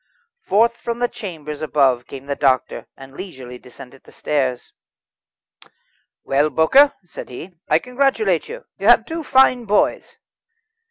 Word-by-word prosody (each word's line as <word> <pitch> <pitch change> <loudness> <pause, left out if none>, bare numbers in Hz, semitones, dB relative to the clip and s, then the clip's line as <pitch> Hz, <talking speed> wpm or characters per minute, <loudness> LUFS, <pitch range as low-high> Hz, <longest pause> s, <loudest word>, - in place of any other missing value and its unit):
Forth 230 +4 +1
from 235 0 -5
the 245 0 0
chamber 165 -11 -8
above 135 -5 +1
came 135 -1 -10
the 140 0 -3
doctor, 130 -3 0
and 135 0 -13
leisurely 130 -10 -9
descended 125 +1 -15
the - - -18
stairs. 130 -4 -3 1.5
"Well, 145 +3 +1
Bowker," 265 - +4
said 170 - -10
he, 145 +9 -9 0.2
"I - - +4
congratulate 275 - 0
you; - - -9
you - - -2
have - - +6
two 330 0 -5
fine 260 -3 +3
boys." 210 0 0
160 Hz, 140 wpm, -20 LUFS, -, 1.5 s, have